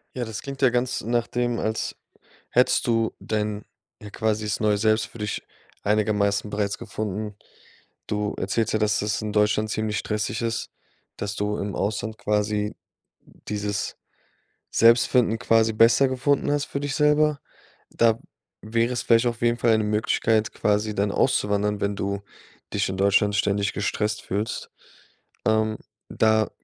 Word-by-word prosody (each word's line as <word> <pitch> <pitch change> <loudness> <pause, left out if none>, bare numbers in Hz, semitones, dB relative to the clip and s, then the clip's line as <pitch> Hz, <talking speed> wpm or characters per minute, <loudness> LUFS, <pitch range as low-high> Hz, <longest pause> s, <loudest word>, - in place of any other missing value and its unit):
Ja, 125 -2 -2
das 110 -2 -6
klingt 140 0 -7
ja 130 - +6
ganz 125 +1 -1
nach 120 +1 0
dem, 120 -1 -1
als 110 -1 -2 0.5
hättest - - +3
du 115 -1 +1
denn, 105 -1 -2 0.4
ja, 105 - -9
quasi 110 0 -1
das 105 - -1
Neue 105 -1 +2
Selbst 110 +1 +2
für - - -14
dich 105 0 -3 0.4
einigermaßen 105 0 +1
bereits 100 -1 -2
gefunden. 105 -2 -4 0.7
Du 105 0 -2
erzählst 110 +3 0
ja, 110 - +2
dass 105 -1 +1
das 105 -1 -1
in 105 -1 -4
Deutschland 105 +1 +2
ziemlich 110 -2 -1
stressig 105 +1 -2
ist, 115 -1 -2 0.5
dass 100 0 -3
du 105 +1 -2
im 100 0 -3
Ausland 110 +2 -2
quasi 105 0 0 0.5
dieses 105 -1 -4 0.7
Selbstfinden 115 0 +4
quasi 115 -2 +3
besser 115 +5 +5
gefunden 140 +2 +1
hast 145 0 0
für 140 - -4
dich 145 -1 -3
selber. 150 0 +3 0.5
Da 115 -1 +2 0.4
wäre 115 +3 0
es 120 - -1
vielleicht 115 +1 +4
auf 120 -1 -1
jeden 120 0 +2
Fall 115 -1 +3
'ne 110 - 0
Möglichkeit, 110 +1 +1
quasi 105 0 0
dann 100 0 +1
auszuwandern, 105 -4 +1
wenn 100 0 -1
du 100 0 -2 0.5
dich 105 0 +1
in 95 - -3
Deutschland 100 +2 +3
ständig 100 -1 +1
gestresst 105 +1 -1
fühlst. 105 +3 -3 0.8
Ähm, 110 0 +2 0.3
da 110 -1 +2
110 Hz, 150 wpm, -24 LUFS, 105-115 Hz, 0.8 s, ja